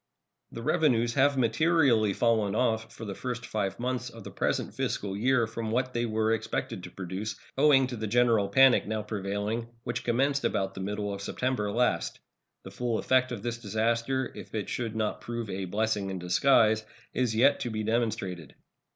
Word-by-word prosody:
The 115 - -7
revenues 120 -6 +2
have 140 +1 +3
materially 125 -3 +3
fallen 110 -2 +1
off 110 -2 0
for 115 - -9
the 100 - -4
first 125 +2 -5
five 100 -3 -2
months 125 0 -2
of 115 -2 -12
the - - -8
present - - -1
fiscal 100 -1 -2
year 120 +3 +2
from 115 0 -5
what 125 +3 0
they 120 0 0
were 110 0 +1
expected 110 - -3
to - - -8
produce, 100 +3 -5 0.2
owing 135 -1 +5
to 125 -1 -5
the 110 -1 -4
general 115 -2 +3
panic 130 +3 +5
now 110 0 -2
prevailing, 105 +2 -3 0.2
which 120 0 -3
commenced 135 +4 +1
about 95 0 0
the 95 - -7
middle 105 +1 -3
of 100 - -6
September 120 0 -1
last. 120 +3 0 0.4
The 95 - -9
full 115 +3 -1
effect 130 +1 +2
of 110 -4 -5
this 120 -1 -3
disaster, 115 +4 0
if - - -9
it 105 -3 -3
should 115 -3 -3
not 110 -1 -1
prove 115 -3 -5
a 95 0 -3
"blessing 105 +1 -1
in 95 - -3
disguise," 110 +5 +3 0.3
is 125 -3 0
yet 135 +5 +4
to 120 - -3
be 110 -1 -3
demonstrated. 110 - -2
115 Hz, 185 wpm, -28 LUFS, 105-125 Hz, 0.4 s, owing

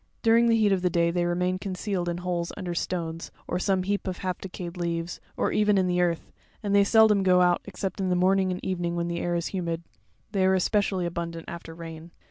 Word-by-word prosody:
During 230 +1 +5
the 230 -1 +4
heat 215 -2 +3
of 190 -2 +2
the 180 - +2
day 170 0 +2
they 175 0 0
remain 180 +1 0
con 190 -1 -4
cealed 180 -2 -2
in 170 0 -1
holes 175 -1 -2
under 175 -2 -3
stones, 165 -1 -3 0.2
or 180 - -1
some 190 -1 +1
heap 200 +1 -2
of 185 -1 -2
half 185 -2 -3
decayed 180 -2 -6
leaves, 170 -1 -3 0.2
or - - +1
even 210 -1 +3
in 190 - +3
the 180 0 +1
earth, 170 -2 -1 0.3
and 200 -1 -1
they 200 0 +6
seldom 215 -1 +5
go 180 -1 +4
out 175 -1 +3
except 195 -1 -5
in 190 -1 0
the 180 - +2
morning 190 +1 +3
and 180 - -5
evening, 175 -2 -1
when 170 0 -1
the 170 0 -2
air 175 0 -1
is 170 -1 -1
humid; 170 -3 -2 0.5
they 195 -2 +1
are 190 0 +4
especially 190 -1 +1
abundant 170 -1 -4
after 165 -1 -8
rain. 165 0 -9
180 Hz, 235 wpm, -27 LUFS, 170-195 Hz, 0.5 s, they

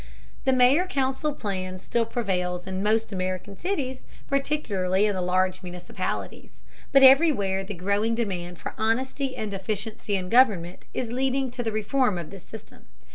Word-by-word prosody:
The 265 - +4
mayor 260 +8 +4
council 270 -2 0
plan 185 -5 -4
still 230 +4 -1
prevails 180 -6 -2
in 190 0 -3
most 220 +1 +1
American 185 +1 -3
cities, 275 - -3 0.2
particularly 210 -10 +1
in 210 - +1
the 185 - -2
larger 185 +1 +1
municipalities. 180 -1 -6 0.3
But 275 -1 +6
everywhere 260 - +5
the 200 +1 -6
growing 200 +5 0
demand 180 -6 -3
for - - -6
honesty 260 +4 0
and 215 -2 -4
efficiency 205 +2 -3
in 185 -1 -3
government 200 -8 +3
is 235 -3 -3
leading 265 +1 0
to 245 - -4
the 225 -2 -2
reform 215 0 +1
of 170 -1 -6
this 195 -3 -10
system. 220 -1 -13
215 Hz, 155 wpm, -26 LUFS, 185-260 Hz, 0.3 s, But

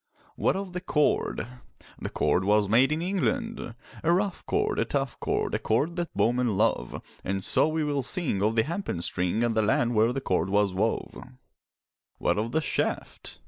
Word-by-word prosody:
What - - +1
of 190 -2 -4
the 180 - -3
cord? 150 -9 +1 0.5
The - - -4
cord 95 - +1
was 105 +1 +3
made 125 +7 +4
in 155 +2 -1
England: 200 - -2 0.3
A 165 - +3
rough 190 +1 0
cord, - - 0
a - - +3
tough - - -2
cord, - - -1
A - - +1
cord 145 +10 0
that 175 -1 -2
bowmen 115 0 +2
love; - - 0 0.2
And 95 0 -2
so - - +2
we 160 0 0
will 145 -2 0
sing 135 - -1
Of 110 +2 +2
the 110 - +4
hempen 160 - -3
string 90 +6 0
And 120 -1 +1
the 110 - +2
land 120 +3 +2
where 110 +1 +3
the 135 - -2
cord 95 -8 0
was 100 -1 +2
wove. 105 +4 -1 1.0
What - - +1
of 115 +2 -2
the 160 - +1
shaft? 145 - -3
120 Hz, 185 wpm, -27 LUFS, 105-165 Hz, 1.0 s, made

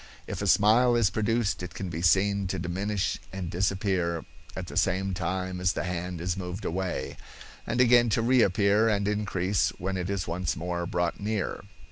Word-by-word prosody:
If - - -5
a - - -1
smile 120 +4 +5
is 115 -4 +3
produced 110 -1 0
it 90 0 -7
can 95 -1 -4
be 85 0 -4
seen 100 +3 +3
to 95 - -3
diminish 95 +3 -2
and 95 -3 -5
disappear 95 -2 0 0.3
at 95 - -4
the - - -9
same 95 +1 +1
time 95 0 -3
as 90 0 +2
the - - -2
hand 90 -1 -4
is 90 +1 -1
moved 90 +1 -6
away, 90 +1 -3 0.5
and - - -1
again 120 -1 +5
to 115 - +1
reappear 110 -3 +3
and 100 -2 +1
increase 100 -3 0
when 95 +1 -3
it 90 0 -3
is 100 -2 -2
once 85 +1 -2
more 85 +1 -3
brought 85 -1 -1
near. 105 -1 -2
95 Hz, 180 wpm, -27 LUFS, 90-105 Hz, 0.5 s, smile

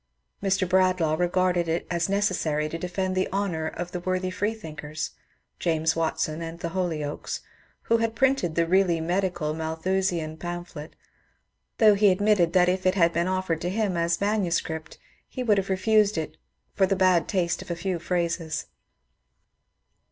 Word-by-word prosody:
Mr. 195 -1 +1
Bradlaugh 185 -3 +3
regarded 180 0 +1
it 165 +1 -1
as 170 +1 0
necessary 180 -7 0
to 165 - -5
defend 185 +2 -2
the 185 - 0
honour 185 -5 -1
of 175 +2 -5
the 180 - -3
worthy 185 +1 -1
freethinkers 165 -7 -4 0.2
— - - -47
James 160 -1 +1
Watson 160 -1 -1
and 165 0 -6
the 170 - -3
Holy 170 -4 -2
oakes 145 0 -4 0.2
— - - -36
who 230 - +3
had 225 0 -1
printed 265 -11 +2
the 170 - +3
really 180 -1 +3
medical 175 -2 -1
Malthusian 160 0 -1
pamphlet, 175 -2 -7 0.8
though 215 -2 +7
he 205 0 +5
admitted 190 -3 +3
that 180 -1 +5
if 185 +1 +1
it 185 - +3
had 170 -3 +3
been 170 +1 +1
offered 185 -3 -1
to 175 - -1
him 205 -1 0
as 170 0 +1
manuscript 175 -6 -1 0.3
he 255 - -4
would 210 -4 +3
have 195 - -4
refused 210 +1 +3
it 155 -1 -3 0.4
for 190 -1 +3
the 195 - +1
bad 185 -3 +3
taste 175 -3 0
of - - -11
a 170 - -1
few 180 0 -2
phrases. 170 -2 -2
180 Hz, 165 wpm, -26 LUFS, 165-190 Hz, 0.8 s, though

